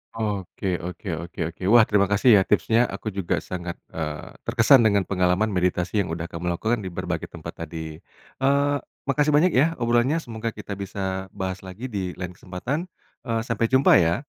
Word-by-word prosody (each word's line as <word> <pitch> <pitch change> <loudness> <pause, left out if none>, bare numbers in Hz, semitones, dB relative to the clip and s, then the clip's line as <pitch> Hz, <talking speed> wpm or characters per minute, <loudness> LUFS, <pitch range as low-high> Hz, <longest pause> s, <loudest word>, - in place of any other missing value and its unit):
Oke 100 -4 -2
oke 90 +2 -7 0.2
oke 85 - -16
oke. 85 - -25
Wah, 115 +2 +7
terima 100 -2 +2
kasih 100 +5 +4
ya - - +4
tipsnya 115 +3 +3
aku - - -7
juga 95 -4 0
sangat, 85 -2 -5 0.2
eee, 75 -2 -5 0.2
terkesan 130 +4 +6
dengan 100 -2 +3
pengalaman 95 +3 +1
meditasi 90 +2 0
yang 95 - 0
udah 85 +1 -5
kamu 85 +1 -5
lakukan 115 +6 0
di 100 - -6
berbagai 85 - -4
tempat - - -8
tadi. 80 -1 -7 0.4
Eee, 140 +2 +3 0.3
makasih 145 +2 +2
banyak 175 +5 +4
ya 160 +5 +3
obrolannya, 120 +4 +2
semoga 115 -1 -4
kita 105 -1 -6
bisa 95 -1 -3
bahas 95 -1 -3
lagi 95 +6 -8
di 95 -5 -3
lain 90 -1 -5
kesempatan, 120 - -4 0.4
eee, 115 -1 0
sampai 115 -1 0
jumpa 130 +3 +5
ya. 85 - +1
100 Hz, 175 wpm, -24 LUFS, 90-120 Hz, 0.4 s, Wah